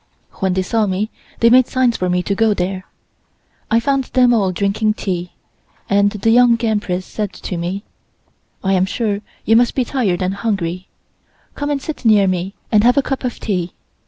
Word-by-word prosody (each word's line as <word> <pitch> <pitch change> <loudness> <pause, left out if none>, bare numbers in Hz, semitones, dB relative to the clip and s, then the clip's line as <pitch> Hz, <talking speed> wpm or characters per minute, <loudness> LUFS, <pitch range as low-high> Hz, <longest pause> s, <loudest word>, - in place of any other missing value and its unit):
When 190 -2 +1
they 190 0 0
saw 220 +2 0
me 200 +3 -2 0.3
they 230 0 +5
made 255 0 +6
signs 255 -2 +1
for 185 - -1
me 180 0 +1
to 200 - -1
go 220 +1 +2
there. 185 0 -3 0.8
I 225 - +3
found 270 +2 0
them 250 -1 +3
all 200 -5 +2
drinking 205 +3 0
tea, 180 -4 -4 0.5
and 200 0 +3
the 210 +2 0
Young 240 0 +5
Empress 195 -4 -1
said 210 -2 -4
to 180 - -6
me, 180 +4 -3 0.8
"I 195 0 +1
am 185 0 +2
sure 205 -1 -2 0.2
you 225 - +4
must 240 +1 +3
be 255 - +1
tired 205 -9 -1
and 185 +1 -1
hungry. 190 -4 -3 0.7
Come 290 0 -4
and 290 -1 0
sit 305 +1 -7
near 215 -4 +5
me 185 +1 -2 0.2
and 210 -1 +4
have 245 +3 +4
a 280 - +4
cup 270 0 -3
of 250 -2 -3
tea." 180 -5 -2
205 Hz, 190 wpm, -18 LUFS, 185-235 Hz, 0.8 s, made